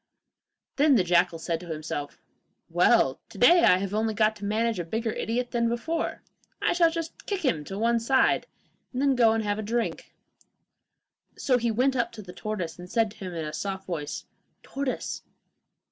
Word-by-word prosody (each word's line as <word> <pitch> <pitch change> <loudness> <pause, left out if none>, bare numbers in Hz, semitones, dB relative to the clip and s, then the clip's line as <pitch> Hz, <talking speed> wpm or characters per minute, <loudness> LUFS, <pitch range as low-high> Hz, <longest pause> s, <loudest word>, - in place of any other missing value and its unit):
Then 285 -1 +5
the 200 - +4
jackal 175 -1 +2
said 165 0 -2
to 175 - -11
himself, 155 -2 -5 0.5
'Well, - - +4
to - - -12
day 345 0 +6
I 180 - +6
have 195 +1 -3
only 220 0 0
got 215 +1 +3
to 205 - -7
manage 220 +1 0
a - - -1
bigger 225 +7 -2
idiot 245 +3 -2
than 235 -1 +1
before. 320 +8 -2 0.4
I - - +1
shall 345 -1 +4
just 330 0 -6
kick 390 -5 -2
him 155 - +1
on 195 +1 -5
one 235 +1 +2
side, 260 +3 +2 0.4
and 255 - -4
then 275 0 +3
go 230 -3 +4
and 225 0 0
have 205 0 -1
a - - -1
drink.' 230 +2 -3 1.2
So 255 -2 +2
he 235 0 0
went 255 +4 +2
up 240 - 0
to 215 -2 -9
the 180 -1 -10
tortoise 185 -4 -4
and 180 0 -9
said 225 -1 +1
to - - -16
him 185 -3 -6
in 160 -2 -3
a 150 - -5
soft 195 +1 -4
voice, 155 -6 -4 0.4
'Tortoise! 275 -2 -3
220 Hz, 190 wpm, -27 LUFS, 185-250 Hz, 1.2 s, day